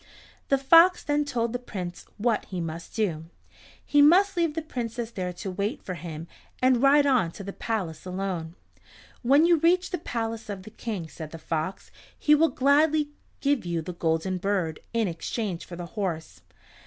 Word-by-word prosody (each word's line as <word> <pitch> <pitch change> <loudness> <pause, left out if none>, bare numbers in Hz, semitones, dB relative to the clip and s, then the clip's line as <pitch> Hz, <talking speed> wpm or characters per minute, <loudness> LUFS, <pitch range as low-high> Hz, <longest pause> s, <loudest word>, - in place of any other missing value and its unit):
The 275 - +4
fox 330 +7 +6
then 295 0 +1
told 235 -4 -1
the 245 - -1
Prince 185 -7 -7
what 225 0 +1
he 185 - -5
must 165 0 -6
do. 175 -8 -1 0.6
He 290 - +4
must 380 +7 +6
leave 335 -3 +1
the 325 - -2
Princess 235 -5 -4
there 185 -5 -3
to 190 +2 -5
wait 205 +8 -3
for 185 - -4
him, 165 -1 -7 0.3
and 255 -1 +3
ride 285 +1 +6
on 255 -11 +3
to 200 - -8
the 200 0 -6
palace 185 -9 -3
alone. 185 -3 -4 0.7
"When 280 +6 +5
you 340 -1 +5
reach 355 +4 +2
the 360 - -2
palace 225 -5 -4
of 195 -2 -5
the 215 - -11
King," 210 -7 -5
said 160 -1 -8
the 165 - -8
fox, 160 +3 -4 0.3
"he 300 - +4
will 320 +2 +5
gladly 295 +2 +3 0.3
give 280 -3 +1
you 170 -2 -2
the 180 - -6
Golden 170 +2 -1
Bird 180 -5 -1
in 230 -3 +1
exchange 180 +2 -3
for 175 - -8
the 175 0 -6
horse. 170 -4 -4
220 Hz, 180 wpm, -26 LUFS, 175-280 Hz, 0.7 s, fox